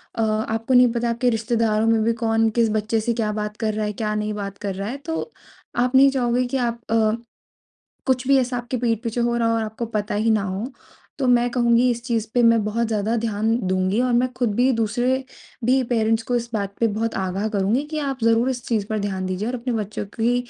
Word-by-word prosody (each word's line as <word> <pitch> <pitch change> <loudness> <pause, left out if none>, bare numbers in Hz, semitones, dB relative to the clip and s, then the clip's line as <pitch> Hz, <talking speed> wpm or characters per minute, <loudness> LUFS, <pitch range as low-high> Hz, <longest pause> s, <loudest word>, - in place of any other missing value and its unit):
अ, 225 - -1
आपको 220 +2 -1
नहीं 250 0 +7
पता 235 0 0
आपके 235 +2 +1
रिश्तेदारों 225 -1 +1
में 225 -1 +3
भी 230 - +2
कौन 225 -1 +1
किस 230 -1 +4
बच्चे 215 +1 0
से 235 +2 0
क्या 220 -2 -1
बात 210 0 -4
कर 215 -1 -1
रहा 215 0 -1
है, 210 - -3
क्या 215 0 -2
नहीं 210 0 -2
बात 200 -1 -5
कर 200 -2 -4
रहा 195 +2 -4
है 265 - -4
तो 325 +7 -3 0.5
आप 250 +2 +1
नहीं 275 +1 +7
चाहोगे 250 -1 +1
कि 270 - -1
आप 235 -2 -2
अ, 220 -1 +3 1.0
कुछ 255 -1 +1
भी 275 - +6
ऐसा 250 -1 0
आपके 240 +1 -4
पीठ 230 -2 0
पीछे 230 +1 -2
हो 235 0 +1
रहा 230 -1 +1
हो 230 - +2
और 225 - 0
आपको 220 +2 -4
पता 205 +1 -2
ही 220 +2 +1
ना 215 -2 +3
हो। 200 +7 -4 0.5
तो 265 - 0
मैं 245 0 +4
कहूँगी 240 0 +3
इस 235 0 -3
चीज़ 230 -3 -1
पे 245 - +4
मैं 230 -2 +5
बहुत 225 +2 0
ज़्यादा 220 +1 0
ध्यान 225 0 0
दूँगी 185 +3 +1
और 250 -1 +1
मैं 245 +2 +3
खुद 245 -4 -1
भी 250 +4 +3
दूसरे 240 +4 0 0.4
भी 260 +3 +3
पेरेंट्स 225 -1 +2
को 245 +2 -1
इस 235 0 -2
बात 200 -2 -2
पे 230 - +4
बहुत 225 +2 -2
आगाह 190 +3 -1
करूँगी 210 +5 +1
कि 310 - -2
आप 275 -3 -2
ज़रूर 230 +3 +3
इस 245 -2 -4
चीज़ 215 -4 0
पर 215 0 -2
ध्यान 190 -2 -2
दीजिए 185 +4 -2
और 250 - -3
अपने 250 +1 -3
बच्चों 210 +1 -5 0.2
की 240 +2 +3
230 Hz, 240 wpm, -22 LUFS, 215-245 Hz, 1.0 s, नहीं